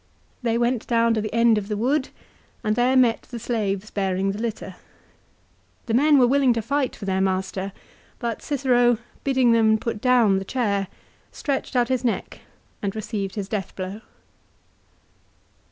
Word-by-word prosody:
They 235 Hz, -2 st, 0 dB
went 240 Hz, 0 st, 0 dB
down 230 Hz, -1 st, +3 dB
to 220 Hz, -, 0 dB
the 215 Hz, -, -4 dB
end 230 Hz, -1 st, +4 dB
of 200 Hz, -, -8 dB
the 210 Hz, -1 st, -2 dB
wood 265 Hz, +5 st, 0 dB, 0.5 s
and 215 Hz, 0 st, +1 dB
there 250 Hz, +3 st, +3 dB
met 240 Hz, -3 st, +3 dB
the 240 Hz, -, -9 dB
slaves 215 Hz, -3 st, -2 dB
bearing 195 Hz, -1 st, 0 dB
the 200 Hz, -, -6 dB
litter. 215 Hz, -5 st, -5 dB, 1.1 s
The 225 Hz, -, -2 dB
men 290 Hz, +4 st, +5 dB
were 255 Hz, -, +6 dB
willing 265 Hz, 0 st, +3 dB
to 230 Hz, -, -1 dB
fight 280 Hz, +3 st, -1 dB
for 200 Hz, -, -8 dB
their 190 Hz, -1 st, 0 dB
master; 190 Hz, 0 st, -1 dB, 0.5 s
but 235 Hz, -2 st, -4 dB
Cicero, 245 Hz, -4 st, +2 dB, 0.3 s
bidding 260 Hz, -3 st, +3 dB
them 220 Hz, -1 st, +4 dB
put 220 Hz, -1 st, -4 dB
down 235 Hz, -6 st, +4 dB
the -, -, -5 dB
chair, 200 Hz, -3 st, -1 dB, 0.4 s
stretched 280 Hz, -3 st, -3 dB
out 245 Hz, 0 st, +2 dB
his 255 Hz, -1 st, 0 dB
neck 235 Hz, -, -2 dB, 0.4 s
and 200 Hz, 0 st, -3 dB
received 210 Hz, -3 st, -4 dB
his 200 Hz, -3 st, -4 dB
death 200 Hz, -3 st, -4 dB
blow. 190 Hz, +3 st, -5 dB
230 Hz, 165 wpm, -23 LUFS, 200-245 Hz, 1.1 s, were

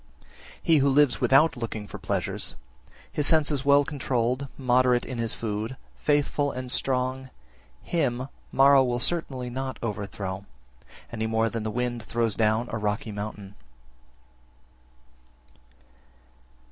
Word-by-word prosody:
8. -, -, -28 dB, 0.4 s
He 165 Hz, -3 st, +5 dB
who 140 Hz, 0 st, +3 dB
lives 140 Hz, -1 st, +3 dB
without 135 Hz, +6 st, +5 dB
looking 115 Hz, -3 st, -5 dB
for -, -, -9 dB
pleasures, -, -, -2 dB, 0.6 s
his 145 Hz, -1 st, +2 dB
senses 150 Hz, -4 st, +3 dB
well 140 Hz, 0 st, +5 dB
controlled, 130 Hz, -2 st, -1 dB
moderate 125 Hz, -1 st, +3 dB
in 125 Hz, -3 st, -5 dB
his 115 Hz, -1 st, -2 dB
food, 110 Hz, +3 st, -4 dB, 0.2 s
faithful 145 Hz, -1 st, +1 dB
and 125 Hz, 0 st, -5 dB
strong, 130 Hz, 0 st, 0 dB, 0.5 s
him 130 Hz, -6 st, -1 dB, 0.2 s
Mara 135 Hz, 0 st, +6 dB
will 120 Hz, -1 st, -1 dB
certainly 130 Hz, -5 st, -1 dB
not 130 Hz, +1 st, -4 dB
overthrow, 100 Hz, -2 st, -4 dB, 0.6 s
any 110 Hz, -1 st, -2 dB
more 110 Hz, 0 st, +1 dB
than 115 Hz, -, -3 dB
the 110 Hz, -, -3 dB
wind 120 Hz, +1 st, -2 dB
throws 115 Hz, 0 st, 0 dB
down 110 Hz, +2 st, +1 dB
a 110 Hz, -, -2 dB
rocky 105 Hz, +1 st, -2 dB
mountain. 105 Hz, -1 st, -6 dB
125 Hz, 125 wpm, -26 LUFS, 110-135 Hz, 0.6 s, Mara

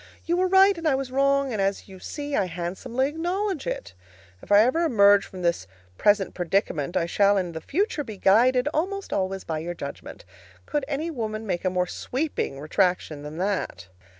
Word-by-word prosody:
You 340 Hz, -, +1 dB
were 370 Hz, +1 st, +2 dB
right, 385 Hz, +1 st, +6 dB
and 330 Hz, -, -2 dB
I 285 Hz, -, +3 dB
was 265 Hz, -1 st, -4 dB
wrong, 275 Hz, 0 st, +2 dB
and, 210 Hz, -, -1 dB
as 195 Hz, 0 st, -1 dB
you 190 Hz, -2 st, -12 dB
see, 290 Hz, +7 st, -5 dB
I -, -, +2 dB
handsomely 185 Hz, +9 st, -2 dB
acknowledge 350 Hz, +3 st, -2 dB
it. 100 Hz, -2 st, -4 dB, 0.5 s
If -, -, -12 dB
I 205 Hz, 0 st, +8 dB
ever 255 Hz, +8 st, +2 dB
emerge 205 Hz, -8 st, +5 dB
from 185 Hz, -1 st, -9 dB
this 170 Hz, -, 0 dB, 0.3 s
present 205 Hz, -, +2 dB
predicament, 175 Hz, -2 st, -1 dB
I 170 Hz, -, +1 dB
shall 200 Hz, +3 st, +3 dB
in 180 Hz, -3 st, -1 dB
the 160 Hz, -1 st, -7 dB
future 325 Hz, -, -1 dB
be 220 Hz, -6 st, -8 dB
guided 250 Hz, +7 st, +4 dB
(almost 390 Hz, +5 st, -2 dB
always) 190 Hz, 0 st, -1 dB
by 160 Hz, -1 st, -3 dB
your 175 Hz, +2 st, -5 dB
judgment. -, -, -8 dB, 0.4 s
Could 295 Hz, -2 st, -2 dB
any 305 Hz, +3 st, -2 dB
woman 220 Hz, -5 st, -4 dB
make 180 Hz, -4 st, -2 dB
a 185 Hz, -, +2 dB
more 180 Hz, 0 st, 0 dB
sweeping 255 Hz, -, -3 dB
retraction 160 Hz, -1 st, 0 dB
than 150 Hz, +2 st, -8 dB
that? 180 Hz, -, -2 dB
205 Hz, 190 wpm, -25 LUFS, 180-285 Hz, 0.5 s, I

